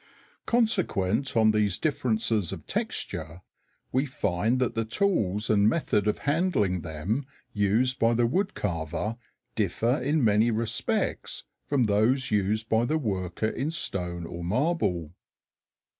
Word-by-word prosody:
Consequent 140 - +1
on 110 -1 +5
these 105 -4 +1
differences 110 - 0
of - - -7
texture, 85 +3 -4 0.5
we 130 +3 +1
find 110 -3 0
that 125 -2 0
the 115 - 0
tools 110 - 0
and 105 0 +4
method 105 - 0
of 105 - +1
handling 145 - +1
them 85 - -3 0.3
used 110 +6 +1
by 115 +1 +3
the 120 +1 +3
wood 190 - 0
carver 85 +3 -3 0.4
differ 115 +5 0
in 145 +2 +1
many 110 +1 +4
respects 115 +1 -1 0.2
from 140 -3 +2
those 120 +6 +2
used 105 +2 +1
by 110 +1 +2
the 155 +6 +1
worker 100 - -2
in 135 +6 -2
stone 90 - -2
or 85 +1 -7
marble. 95 - 0
110 Hz, 130 wpm, -27 LUFS, 100-130 Hz, 0.5 s, on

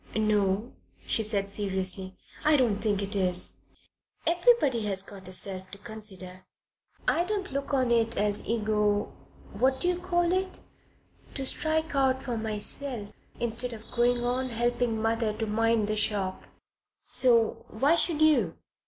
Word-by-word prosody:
"No," 210 +1 +1 0.3
she - - +3
said 200 -2 0
seriously. 190 -1 -1 0.3
"I 305 0 +5
don't 235 -6 +2
think 205 -2 0
it 200 +1 -1
is. 180 -2 +1 0.7
Everybody 340 - +3
has 190 -1 +2
got 195 -2 -10
a - - -8
self 185 0 -2
to 200 - -9
consider. 195 -3 -7 0.6
I 340 - +3
don't 395 -2 -3
look 275 +1 -3
on 260 -3 +2
it 230 -1 +2
as 205 0 +1
ego 210 -2 0 0.4
what 260 +5 +1
d' - - -5
you 360 0 +1
call 350 -1 +1
it 375 +1 0 0.7
to 270 - -3
strike 315 +3 -1
out 265 -1 +2
for 245 - -3
myself 220 +1 -3 0.3
instead 240 +1 0
of 220 -1 -11
going 240 0 +2
on 255 +1 -1
helping 240 -1 0
mother 225 0 0
to 220 - -3
mind 225 0 +1
the 215 - 0
shop. 205 -3 -1 0.6
So 235 -3 +3
why 275 +8 +2
should 330 -2 +2
you?" 310 -1 +3
225 Hz, 150 wpm, -28 LUFS, 205-265 Hz, 0.7 s, I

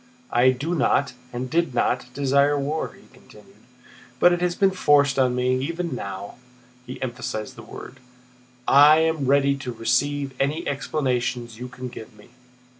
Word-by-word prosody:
"I 125 +2 +4
do 140 +7 -1
not, 140 -5 +1 0.2
and 125 +1 -4
did 165 -1 0
not, 125 +1 0
desire 140 +1 +2
war," 145 +3 -3
he - - -19
continued, - - -19 0.6
"but 175 - +6
it 175 - -2
has 175 -1 0
been 195 -1 +3
forced 145 -6 +3
on 125 -1 +2
me. 125 +1 +1
Even 170 +2 -3
now" 100 -3 -6 0.5
(he 125 - -7
emphasized 120 -4 -5
the - - -10
word) 130 - -11 0.7
"I 145 +3 +7
am 160 -4 +1
ready 140 0 +3
to 130 -2 -6
receive 135 +4 -1
any 150 +5 -1
explanations 125 -5 -2
you 125 - -6
can 125 0 -8
give 115 -2 -11
me." - - -18
140 Hz, 160 wpm, -23 LUFS, 125-150 Hz, 0.7 s, I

